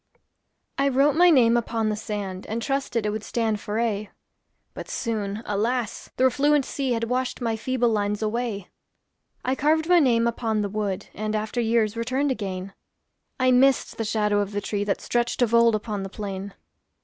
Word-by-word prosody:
I 275 - +3
wrote 275 +2 +3
my 355 +2 +6
name 240 -7 +5
upon 230 -2 0
the 210 - 0
sand, 205 -3 -5
And 225 +2 -2
trusted 255 -3 -1
it 210 - +1
would 215 0 -4
stand 220 -3 -1
for 210 +2 -3
aye; 215 -3 -1 0.6
But, - - -8
soon, 215 -3 -3
alas! 225 +3 -2
the 255 - +2
refluent 280 +2 +3
sea 270 -3 -2
Had 230 0 -1
washed 250 +2 -1
my 230 -3 -1
feeble 245 +1 0
lines 210 -1 -1
away. 215 -3 -2 0.8
I 255 - +1
carved 315 +4 +1
my 355 -1 +6
name 235 -6 +3
upon 225 -2 0
the 200 - -2
wood, 200 -1 -2
And, 215 0 -3
after 215 +3 -1
years, 225 -1 +1
returned 260 +5 0
again; 195 -5 -4 0.7
I 255 0 +4
missed 265 +2 +3
the 225 - -1
shadow 210 -1 +1
of 205 0 -2
the 205 - 0
tree 205 0 -2
That 205 -1 -1
stretched 240 +1 0
of 235 -1 0
old 235 -1 +5
upon 210 -1 -3
the 195 - -5
plain. 195 -1 -6
225 Hz, 185 wpm, -25 LUFS, 210-250 Hz, 0.8 s, my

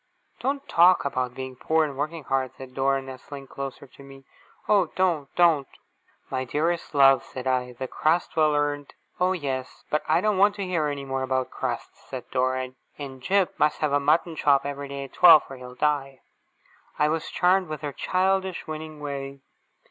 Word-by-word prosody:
'Don't 275 +1 -2
talk 175 0 +5
about 130 -3 -2
being 130 -1 -6
poor, 160 +5 +1
and 145 -2 -6
working 155 +3 -3
hard!' 130 -1 -1
said 130 -1 -10
Dora, 135 0 +1
nestling 135 +1 -9
closer 135 0 -7
to 140 - -18
me. 135 0 -13 0.4
'Oh, 200 -4 +4
don't, 170 -7 +1
don't!' 165 -6 +4 0.6
'My 130 0 -1
dearest 160 +5 -2
love,' 135 -1 +6
said 130 0 -8
I, 125 -1 0
'the 130 +2 -5
crust 160 +6 0
well 155 -2 +3
earned 145 -1 -2
' - - -37
'Oh, 180 +1 +3
yes; 135 -7 -4
but 150 - +2
I 155 - +4
don't 205 0 +1
want 205 +1 +5
to 200 - -4
hear 170 -5 0
any 140 -1 -4
more 135 0 -2
about 130 -1 -1
crusts!' - - -5
said - - -6
Dora. 130 0 0 0.3
'And 135 -3 -8
Jip 190 +5 +1
must 150 - +3
have 150 -2 +1
a 145 - +4
mutton 160 +3 +2
chop 140 -2 +3
every 140 0 -4
day 140 0 -5
at 135 - -11
twelve, 170 -4 +8
or 135 - -7
he'll 125 0 -10
die.' 135 -2 -1 0.8
I 150 - +3
was 160 +1 -2
charmed 185 +1 +2
with 155 -1 -6
her 145 -2 -4
childish, 190 +1 0
winning 155 -1 -7
way. 140 -1 -5
145 Hz, 190 wpm, -25 LUFS, 135-165 Hz, 0.8 s, twelve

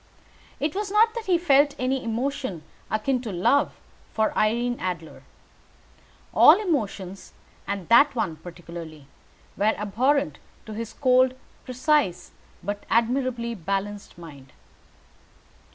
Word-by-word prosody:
It 295 +1 -1
was 410 0 -3
not 440 +2 +4
that 465 -3 -6
he 360 -2 +4
felt 285 -4 +3
any 260 +1 -1
emotion 230 - -3 0.3
akin 245 +4 0
to 230 -4 -5
love 190 +11 +1 0.3
for 220 -1 0
Irene 240 +3 +1
Adler. 175 -3 -5 1.1
All 325 +6 +8
emotions, 205 - -3 0.3
and 200 -3 -4
that 280 +4 +6
one 170 -9 -2
particularly, 170 -4 -10 0.5
were 215 +2 +2
abhorrent 255 +8 0 0.3
to 220 - -8
his 225 +1 -6
cold, 255 -1 +3 0.3
precise 255 - 0 0.3
but 205 +2 -4
admirably 235 0 0
balanced 200 +1 -4
mind. 145 -6 -13
230 Hz, 115 wpm, -25 LUFS, 195-275 Hz, 1.1 s, All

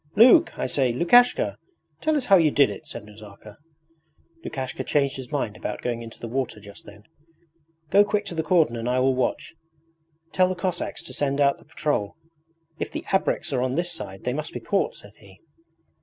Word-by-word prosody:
'Luke, 230 +3 +6
I - - -2
say, 130 -1 +1
Lukashka! 240 - +4 0.4
Tell 310 0 +2
us 265 - -2
how 195 - +6
you 165 -4 +5
did 140 -6 +3
it!' 100 - -10
said - - -8
Nazarka. 105 0 -14 0.9
Lukashka 130 -1 -5
changed 140 -1 0
his 130 +1 -9
mind 130 -8 -2
about 105 - -5
going 120 -1 -2
into 115 -1 -10
the 115 - -6
water 125 -2 -3
just 100 -1 -13
then. 105 0 -14 0.9
'Go 200 +1 +7
quick 205 0 -1
to 180 - -5
the 160 - -1
cordon 160 -6 +2
and 115 +1 -3
I 125 - +1
will 130 +1 +3
watch. 130 -1 -2 0.8
Tell 185 -1 +3
the 185 - -2
Cossacks 180 -1 -3
to - - -10
send 140 -1 -1
out 140 -1 +3
the - - -20
patrol. 145 -10 -2 0.6
If - - -3
the - - -6
ABREKS 175 -4 0
are 125 - +1
on 130 0 -1
this 175 +2 -1
side 95 - -8
they 125 - -1
must 155 +3 -5
be - - -4
caught,' 470 - -1
said - - -14
he. - - -18
140 Hz, 200 wpm, -24 LUFS, 120-175 Hz, 0.9 s, Go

